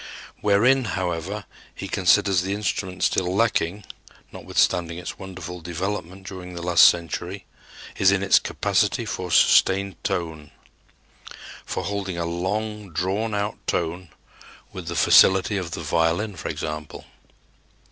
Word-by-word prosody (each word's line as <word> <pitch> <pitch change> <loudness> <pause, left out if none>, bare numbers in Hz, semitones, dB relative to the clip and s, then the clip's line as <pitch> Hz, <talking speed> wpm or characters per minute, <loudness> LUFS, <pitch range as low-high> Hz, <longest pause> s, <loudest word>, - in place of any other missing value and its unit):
Wherein, 120 +6 +3
however, 95 +3 -3 0.3
he - - -6
considers 95 -3 +3
the 95 +2 -2
instrument 95 -2 -3
still 90 -1 +1
lacking, 105 -3 0 0.5
notwithstanding 85 -1 0
its 90 - -7
wonderful 90 -2 -8
development 95 +2 -5
during 90 -2 -8
the 85 - -6
last 85 -1 +6
century, 90 +3 -4 0.5
is 95 0 +5
in 100 0 +1
its 100 - +5
capacity - - 0
for 90 -1 -4
sustained 95 +2 +3
tone 80 -5 -3 1.2
for - - -3
holding 100 -3 -3
a 85 - -2
long 105 +4 -3
drawn 100 +6 -1
out 100 +1 -2
tone 85 +1 -2 0.6
with - - -8
the - - -4
facility 95 +2 +5
of 90 -3 -4
the 85 - -5
violin, 85 +6 0
for 80 - -5
example. 75 -1 -6
95 Hz, 125 wpm, -23 LUFS, 85-100 Hz, 1.2 s, last